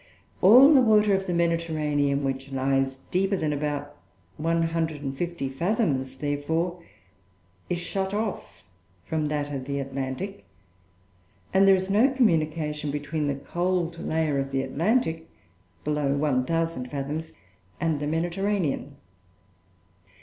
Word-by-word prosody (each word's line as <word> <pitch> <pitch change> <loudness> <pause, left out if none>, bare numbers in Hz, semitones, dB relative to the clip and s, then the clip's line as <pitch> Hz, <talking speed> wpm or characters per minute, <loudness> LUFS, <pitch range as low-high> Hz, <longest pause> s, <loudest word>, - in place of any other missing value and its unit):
All 255 +10 +8
the 270 - +7
water 215 -3 +4
of 195 0 0
the - - -1
Mediterranean 155 -4 0
which 135 0 -3
lies 135 0 +1 0.2
deeper 195 +2 +1
than 155 -4 -1
about 145 0 -3 0.4
150 165 -1 -1
fathoms, 135 - 0
therefore, 160 +5 -2 0.9
is 175 - 0
shut 190 +2 -3
off 210 -1 -4 0.4
from 155 -1 -1
that 145 -1 -2
of 130 -2 -4
the 140 +1 -3
Atlantic, 135 +8 -4 1.1
and 195 +1 +5
there 195 - +8
is 190 +1 -2
no 220 +7 +5
communication 155 - +1
between 145 +1 -2
the 140 - 0
cold 175 +3 -2
layer 155 -4 0
of 135 0 -2
the 135 -1 -1
Atlantic 160 - 0 0.5
(below 150 -2 0
1,000 145 0 0
fathoms) 145 +4 -4 0.5
and 160 -3 0
the 145 - -2
Mediterranean. 170 -2 -1
160 Hz, 120 wpm, -26 LUFS, 140-180 Hz, 1.1 s, All